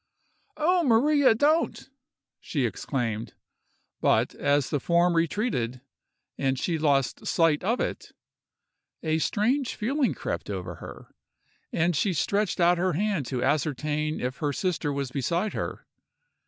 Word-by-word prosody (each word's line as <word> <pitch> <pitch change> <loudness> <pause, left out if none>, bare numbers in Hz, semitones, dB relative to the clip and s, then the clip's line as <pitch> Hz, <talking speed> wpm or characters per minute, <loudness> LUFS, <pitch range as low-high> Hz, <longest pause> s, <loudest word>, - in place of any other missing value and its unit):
"Oh, 355 +4 +3
Maria, 275 +1 +4
don't!" 295 +1 +1 0.5
she 140 -6 -1
exclaimed; 115 0 -3 0.6
but - - +2
as 145 -1 +1
the 145 - +1
form 170 +4 +3
retreated, 165 - 0 0.6
and 135 -1 +1
she 165 +4 -1
lost 140 -5 +1
sight 165 -2 +2
of 230 +6 +1
it, - - -3 0.9
a 160 0 +1
strange 240 - 0
feeling 265 +4 0
crept - - -4
over 95 -3 -5
her, - - -11 0.6
and 170 +1 +1
she 185 +6 +1
stretched 200 +6 0
out 175 0 +4
her 185 +1 +1
hand 190 - -1
to 125 0 -2
ascertain 150 +2 0
if 125 +1 -3
her 145 -2 -1
sister 165 -1 -1
was 140 -2 -3
beside 170 - -1
her. - - -4
165 Hz, 130 wpm, -27 LUFS, 140-210 Hz, 0.9 s, Maria